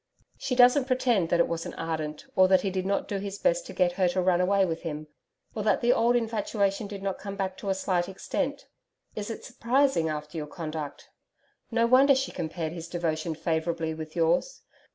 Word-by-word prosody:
She 270 -2 -2
doesn't 250 +2 +6
pretend 245 -9 +1
that 175 - +2
it 170 - +4
wasn't 165 0 -4
ardent, 155 -2 -4
or 185 0 +6
that 190 0 +4
he 195 - -1
did 185 0 -2
not 200 - 0
do 200 - -2
his 200 0 -5
best - - +1
to - - -8
get 180 -1 +2
her 185 0 +1
to 180 +1 0
run 180 -1 +3
away 195 +1 +3
with 165 -2 -3
him 155 -2 -5 0.5
or 215 - -3
that 210 0 +2
the 240 +1 +4
old 235 +1 +3
infatuation 215 -3 0
did 200 -1 -7
not 195 -1 -2
come 200 0 -6
back 190 -1 -2
to 200 - -5
a 190 - +2
slight 185 -2 0
extent 280 +8 -3 0.5
Is 210 0 -4
it 225 - -6
surprising 255 - +1
after 150 +1 -5
your 150 - -5
conduct? 155 -2 -6 0.6
No 230 -1 +2
wonder 265 +3 +6
she 265 +1 -1
compared 160 -1 -4
his 170 -1 -7
devotion 165 -2 -2
favourably, 160 0 -1
with 155 0 -8
yours. 175 - +1
190 Hz, 205 wpm, -27 LUFS, 165-230 Hz, 0.6 s, doesn't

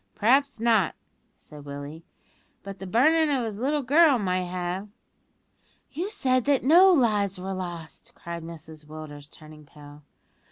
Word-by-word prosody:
"Humph! 95 0 -46
p'raps 270 +3 +2
not," 225 -6 +2 0.4
said 150 -1 -14
Willie; 145 +3 -9 0.6
"but 195 0 -9
the 195 - -7
burnin' 310 - +3
of 265 -5 0
his 215 -2 -6
little 285 +3 -1
girl 290 +1 +5
might 185 -4 -1
have 180 +3 -4 0.5
" - - -40
"You 345 +7 -4
said 255 - 0
that 285 -2 +2
no 350 +8 +6
lives 210 - +1
were 190 +1 -5
lost," 175 -3 -8
cried 170 0 -7
Mrs 160 -2 -11
Willders, 150 -2 -10
turning 155 -1 -15
pale. 145 0 -15
195 Hz, 155 wpm, -25 LUFS, 160-260 Hz, 0.6 s, no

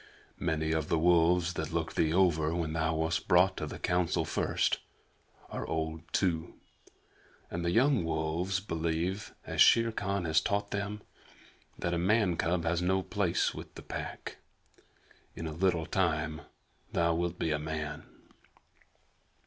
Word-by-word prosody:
Many 80 0 0
of 80 -2 -1
the 85 - +2
wolves 85 +1 +3
that 80 -1 -4
looked 85 -1 -2
thee 80 - +2
over 85 -3 +3
when 80 -2 -2
thou 80 0 0
wast 80 +1 -1
brought 90 +1 +5
to - - -3
the - - -7
Council 90 -1 0
first - - 0 0.7
are - - -3
old 80 0 -2
too, 85 -4 0 1.0
and 85 0 -3
the 85 - +1
young 125 +3 +3
wolves 80 +4 -1
believe, 85 +1 -2
as - - 0
Shere 115 0 +6
Khan 100 -4 -2
has 80 -1 +3
taught 100 +3 -1
them, 105 +1 -3 0.7
that 85 - -2
a 85 - 0
man 95 0 +3
cub 85 +1 0
has 85 +1 0
no 95 +1 +1
place 100 -5 0
with - - -10
the - - -9
Pack. - - -6 1.0
In 80 - -5
a 80 - -3
little 85 -1 +1
time 80 -5 0 0.5
thou 85 0 +2
wilt 85 +1 -1
be 80 - -1
a 75 - 0
man." 75 0 -4
85 Hz, 150 wpm, -31 LUFS, 80-95 Hz, 1.0 s, Shere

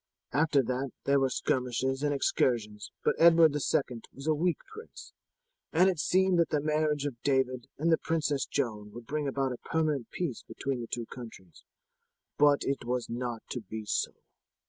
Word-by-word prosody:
After 150 -1 +3
that 130 +2 -2
there 140 0 +3
were 135 -1 +2
skirmishes 130 +1 -1
and 145 0 +1
excursions, 115 -6 0
but - - +3
Edward 165 -2 +7
II 135 -4 0
was 135 - -10
a 155 - +3
weak 165 +2 +1 0.2
prince, 440 +1 -11 0.6
and 180 +4 +5
it 175 - -6
seemed 185 +2 +3
that 170 - +3
the 150 - +1
marriage 150 -1 0
of 125 -5 -5
David 130 -3 0
and 165 +3 +1
the 160 - +4
Princess 150 -4 0
Joan 110 -7 -2
would 120 +1 -9
bring 150 +2 -2
about 135 -1 0
a - - -7
permanent 155 -6 -1
peace 165 -10 -3
between 135 -3 -4
the 115 - -6
two 120 0 -3
countries; 110 -9 -11 0.8
but 145 -1 +5
it 135 -2 -2
was 125 0 -2
not 120 -1 -4
to 125 - -3
be 110 +1 -7
so." - - -1
135 Hz, 175 wpm, -30 LUFS, 120-155 Hz, 0.8 s, Edward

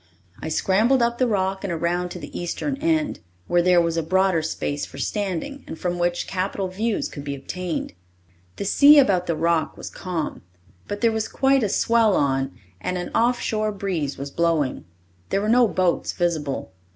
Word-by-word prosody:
I - - -4
scrambled 220 - +3
up 235 0 0
the 255 - +3
rock 195 -3 0
and 195 - -2
around 170 +2 -1
to - - -7
the - - -9
eastern 175 +11 -2
end, 315 0 0 0.3
where 175 - +3
there 180 0 +5
was 170 -1 +1
a - - +2
broader 185 +1 +2
space 145 -2 -3
for - - -8
standing 210 - -3
and 160 - -7
from 175 0 -2
which 175 0 0
some - - -16
capital 190 0 -2
views 215 +4 -1
could 145 - -8
be 140 -1 -4
obtained. 170 - -4 0.6
The - - -4
sea 290 +8 +7
about 195 -10 +4
the 170 - 0
rock 165 0 0
was - - -7
calm, 175 -5 -4 0.5
but 205 0 -5
there 230 -1 +4
was 220 -1 -1
quite 270 0 +2
a 210 - +1
swell 225 -1 +3
on 135 -1 +1 0.3
and 180 - -2
an 175 - -5
off 240 +1 +2
shore 215 -1 0
breeze 185 -8 -3
was 140 +1 -6
blowing. 165 - 0 0.4
There - - +1
were 210 - -2
no 240 +1 +5
boats 185 -3 0
visible. 155 - -2
185 Hz, 190 wpm, -23 LUFS, 170-220 Hz, 0.6 s, sea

